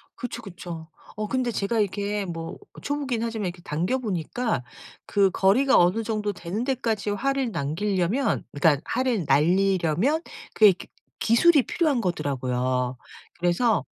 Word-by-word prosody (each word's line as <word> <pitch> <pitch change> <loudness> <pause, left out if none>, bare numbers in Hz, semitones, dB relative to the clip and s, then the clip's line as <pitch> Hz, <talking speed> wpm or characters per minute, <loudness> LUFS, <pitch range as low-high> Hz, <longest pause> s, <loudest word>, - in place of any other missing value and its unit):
그쵸, 240 -1 -6
그쵸. 175 -4 -8 0.3
어 215 0 -3
근데 255 -1 0
제가 215 +2 -1
이렇게 205 0 -1
뭐 165 -2 -6 0.2
초보긴 275 -5 -2
하지만 220 -4 -2
이렇게 175 0 -7
당겨 175 +12 -1
보니까 215 - -2 0.4
그 200 -1 +3
거리가 250 +11 +4
어느 180 +6 +3
정도 210 -2 -2
되는 195 +7 -4
데까지 230 -6 -1
활을 270 +3 0
남기려면 185 - 0
그러니까 145 0 +3
활을 240 - 0
날리려면 180 - +2 0.3
그게 210 -2 +7
기 - - -12 0.3
기술이 275 +5 +5
필요한 300 -8 +1
거더라고요. 130 - -1 0.4
그래서 180 +7 +2
205 Hz, 315 characters per minute, -25 LUFS, 170-235 Hz, 0.4 s, 그게